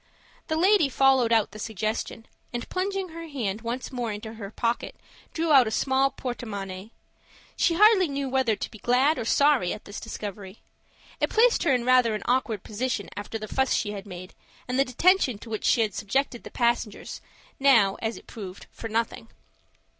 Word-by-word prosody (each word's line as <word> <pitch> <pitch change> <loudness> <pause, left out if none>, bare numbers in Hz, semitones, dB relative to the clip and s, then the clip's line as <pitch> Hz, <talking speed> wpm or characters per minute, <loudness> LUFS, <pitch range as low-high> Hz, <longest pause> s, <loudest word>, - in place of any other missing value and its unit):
The 315 - -1
lady 370 -3 +4
followed 265 -3 +3
out 225 -3 +3
the 215 - -10
suggestion, 220 +1 -3 0.3
and, 240 -1 -4
plunging 385 0 -2
her 330 0 -8
hand 225 -8 -3
once 240 +4 -4
more 245 -3 -3
into 215 +2 -7
her 210 -3 -7
pocket, 230 +2 -2 0.4
drew 325 -1 -1
out 260 -4 +7
a - - 0
small 265 +4 +2
porte 250 -2 -6
monnaie. 195 -2 -6 0.7
She 335 - +2
hardly 415 -1 +6
knew 280 -1 -3
whether 260 -4 +1
to - - -6
be 215 - -12
glad 260 +8 +2
or - - -3
sorry 280 -7 +3
at 210 - -10
this 205 - -7
discovery. 205 -2 -7 0.6
It - - +1
placed 470 +2 +4
her 310 - +4
in 240 -1 -2
rather 250 -3 +4
an 210 - -5
awkward 240 -5 0
position 225 0 -3
after 205 +2 -5
the 215 -1 -7
fuss 265 +4 +1
she 205 - -1
had 200 0 -7
made, 185 -1 -9 0.3
and 250 +2 -1
the 275 - +4
detention 275 - +3
to 225 +2 -12
which 215 - -3
she 235 - +4
had 215 -3 0
subjected 240 +5 -1
the - - -9
passengers, 235 -3 -1 0.4
now, 230 -8 +5
as 225 0 -2
it - - -14
proved, 195 -4 -9
for 225 - -7
nothing. 230 +1 -2
235 Hz, 190 wpm, -26 LUFS, 215-275 Hz, 0.7 s, out